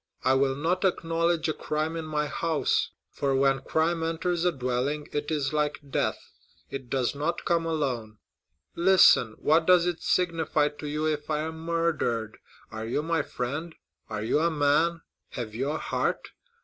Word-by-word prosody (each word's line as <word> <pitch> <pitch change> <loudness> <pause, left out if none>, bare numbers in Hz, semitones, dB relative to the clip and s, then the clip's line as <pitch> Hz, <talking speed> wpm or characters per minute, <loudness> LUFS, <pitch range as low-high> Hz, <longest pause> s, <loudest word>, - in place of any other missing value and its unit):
I 130 +1 +4
will 135 0 +2
not 170 +6 0
acknowledge 170 -2 +1
a 155 - 0
crime 155 +2 -2
in 165 -1 -4
my 150 -1 -1
house; 160 +1 0 0.2
for 140 -1 0
when 135 0 +3
crime 160 +4 0
enters 165 +1 -1
a 180 - +4
dwelling, 135 +2 -2
it 145 0 -2
is 150 -3 -1
like 150 -1 0
death—it 135 -1 -5
does 130 -2 0
not 150 +4 -2
come 170 -1 +1
alone.' 125 -9 -2 0.6
Listen. 170 -10 +5
What 160 +2 +2
does 180 -2 +6
it 175 -1 -2
signify 165 -4 +1
to 150 0 -8
you 150 +1 -1
if 150 -1 -2
I 150 -1 0
am 160 +1 -5
murdered? 165 -10 -1 0.3
Are 110 0 -5
you 135 +6 -1
my 165 -1 +1
friend? 145 +6 -4 0.3
Are 110 -1 -3
you 115 - +2
a 165 +2 +3
man? 155 +2 +2 0.3
Have 115 -4 -5
you 130 +5 -2
a 155 - -1
heart? - - -2
150 Hz, 165 wpm, -27 LUFS, 135-165 Hz, 0.6 s, does